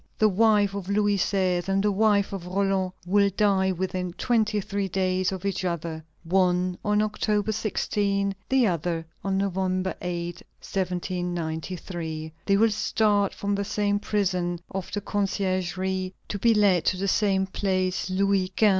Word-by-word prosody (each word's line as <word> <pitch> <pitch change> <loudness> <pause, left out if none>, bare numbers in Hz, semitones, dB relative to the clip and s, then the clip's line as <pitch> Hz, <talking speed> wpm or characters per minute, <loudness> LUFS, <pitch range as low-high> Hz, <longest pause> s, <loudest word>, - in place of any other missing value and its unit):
The 215 - +4
wife 205 0 +3
of 200 -2 -5
Louis 205 0 +2
XVI. 185 -2 +1
and 195 0 +2
the 210 - +3
wife 200 -1 +2
of 180 -3 -5
Roland 190 0 0
will 200 +2 +3
die 195 -2 +3
within 180 -1 -3
twenty 220 -1 +1
three 200 0 -2
days 185 0 0
of 190 0 -5
each 195 -1 -1
other: 165 -2 -3 0.2
one 180 0 +2
on 210 0 +2
October 210 0 0
16, 200 -2 0 0.2
the 265 -2 +4
other 170 -3 -1 0.2
on 195 -1 0
November 190 -1 0
8, 175 -1 -3 0.2
1793. 175 -3 -3
They 195 -1 +4
will 225 +1 +4
start 210 -1 +2
from 205 0 -2
the 200 0 0
same 205 0 0
prison 180 -4 0
of 190 -2 -5
the 205 - -2
Conciergerie, 190 -2 -1
to 205 - -3
be 230 +2 +4
led 195 -5 +4
to 185 - +2
the 195 +2 -1
same 195 -1 +2
Place 185 -1 -1
Louis 195 0 +1
XV. 215 - +5
190 Hz, 155 wpm, -26 LUFS, 180-205 Hz, 0.2 s, XV